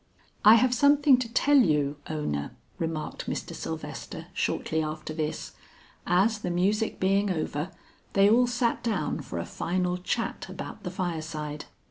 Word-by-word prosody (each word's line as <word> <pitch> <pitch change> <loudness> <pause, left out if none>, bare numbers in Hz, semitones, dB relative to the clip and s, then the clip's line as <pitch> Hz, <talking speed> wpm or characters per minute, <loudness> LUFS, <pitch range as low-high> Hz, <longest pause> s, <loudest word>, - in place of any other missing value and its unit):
"I 215 +2 +9
have 250 +2 +4
something 285 +1 +5
to 230 -2 -4
tell 285 +3 +5
you, 150 - +2
Ona," 75 - -2 0.3
remarked 165 -2 -3
Mr. - - -4
Sylvester - - -6
shortly 160 0 -1
after 155 0 -4
this, 155 -1 -3 0.6
as 200 +5 +3
the 180 - -3
music 200 +5 0
being 195 +2 +2
over, 155 -2 -2 0.4
they 195 0 +5
all 240 +4 +5
sat 240 -1 0
down 230 -2 -1
for - - -6
a - - -2
final 180 0 -1
chat 180 - -2
about - - -7
the - - -4
fireside. 155 -5 -4
180 Hz, 145 wpm, -27 LUFS, 155-230 Hz, 0.6 s, I